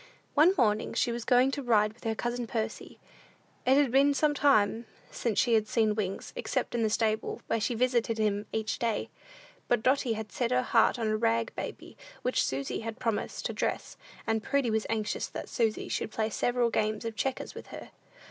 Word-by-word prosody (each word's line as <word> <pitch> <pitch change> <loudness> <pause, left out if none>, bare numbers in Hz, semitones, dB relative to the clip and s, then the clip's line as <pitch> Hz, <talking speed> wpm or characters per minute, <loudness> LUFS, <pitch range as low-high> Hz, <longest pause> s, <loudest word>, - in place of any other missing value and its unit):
One 325 +6 +5
morning 215 -3 +1
she 240 - +1
was 235 0 -4
going 250 +2 +4
to 285 - -3
ride 215 -4 +3
with 240 - -20
her 225 0 0
cousin 240 +1 -3
Percy. 220 -1 -4 0.7
It 265 +1 +6
had 285 -4 +3
been 280 +2 +4
some 300 +1 +2
time 230 -6 +3 0.2
since 230 -4 -2
she 240 - +3
had 215 -1 +3
seen 220 -1 +2
Wings, 200 -3 -4
except - - -2
in 240 - 0
the 220 - +2
stable, 220 0 -1
where 225 -1 -1
she 240 - 0
visited 235 -1 +1
him 210 -1 0
every 220 - -1 0.2
day. 230 -4 -1 0.6
But 240 -2 +1
Dotty 260 -2 +2
had 215 -2 -6
set 235 +4 -1
her 250 0 +2
heart 235 0 +3
on 230 - -2
a 215 0 +1
rag 115 - +1
baby - - -7 0.3
which - - +1
Susy 135 +1 -2
had 225 0 -5
promised 230 -4 -2
to - - -1
dress, - - -2 0.3
and 225 0 0
Prudy 270 0 0
was 220 0 0
anxious 215 -1 -1
that - - -7
Susy 225 -3 0
should - - -2
play 220 0 -2
several 240 0 +1
games 215 +1 -1
of 225 -1 -4
checkers 265 +3 -2
with - - -10
her. - - -10
230 Hz, 200 wpm, -29 LUFS, 215-245 Hz, 0.7 s, It